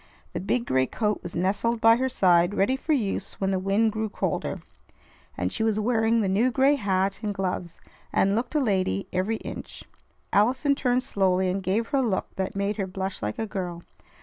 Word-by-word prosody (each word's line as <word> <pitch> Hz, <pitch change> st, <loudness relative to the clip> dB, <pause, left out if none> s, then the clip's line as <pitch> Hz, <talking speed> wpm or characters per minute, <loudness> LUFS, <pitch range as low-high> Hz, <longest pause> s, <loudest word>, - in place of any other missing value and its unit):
The -, -, -2 dB
big 235 Hz, +5 st, -1 dB
gray 130 Hz, 0 st, +2 dB
coat 210 Hz, -2 st, -1 dB
was 175 Hz, -, -7 dB
nestled 205 Hz, +6 st, 0 dB
by 225 Hz, +1 st, +6 dB
her 260 Hz, +1 st, 0 dB
side 180 Hz, -5 st, +3 dB
ready 205 Hz, +7 st, +2 dB
for 290 Hz, +4 st, -4 dB
use 205 Hz, -7 st, -2 dB
when 195 Hz, 0 st, -1 dB
the 190 Hz, -, +1 dB
wind 200 Hz, +4 st, +2 dB
grew 220 Hz, 0 st, -2 dB
colder, -, -, -3 dB, 0.7 s
and -, -, -1 dB
she -, -, -3 dB
was 220 Hz, -1 st, +1 dB
wearing 225 Hz, 0 st, +2 dB
the 200 Hz, -, 0 dB
new 210 Hz, +7 st, +2 dB
gray 265 Hz, +4 st, +4 dB
hat 195 Hz, -6 st, 0 dB
and 210 Hz, -2 st, -2 dB
gloves, 185 Hz, -3 st, -3 dB, 0.3 s
and 195 Hz, +1 st, +2 dB
looked 240 Hz, +6 st, -2 dB
a -, -, +4 dB
lady 190 Hz, -, 0 dB
every 190 Hz, +5 st, 0 dB
inch. -, -, -8 dB, 0.5 s
Allison 255 Hz, +7 st, +3 dB
turned 250 Hz, -2 st, +1 dB
slowly, 190 Hz, -6 st, +1 dB
and 195 Hz, +1 st, -2 dB
gave 200 Hz, +5 st, -1 dB
her 275 Hz, -, +1 dB
a -, -, +3 dB
look 220 Hz, -7 st, -2 dB
that 190 Hz, 0 st, -3 dB
made 200 Hz, +1 st, -1 dB
her 195 Hz, -2 st, -2 dB
blush 190 Hz, +1 st, -4 dB
like 105 Hz, 0 st, -3 dB
a 225 Hz, -, -2 dB
girl. 180 Hz, -5 st, -5 dB
205 Hz, 200 wpm, -26 LUFS, 190-230 Hz, 0.7 s, by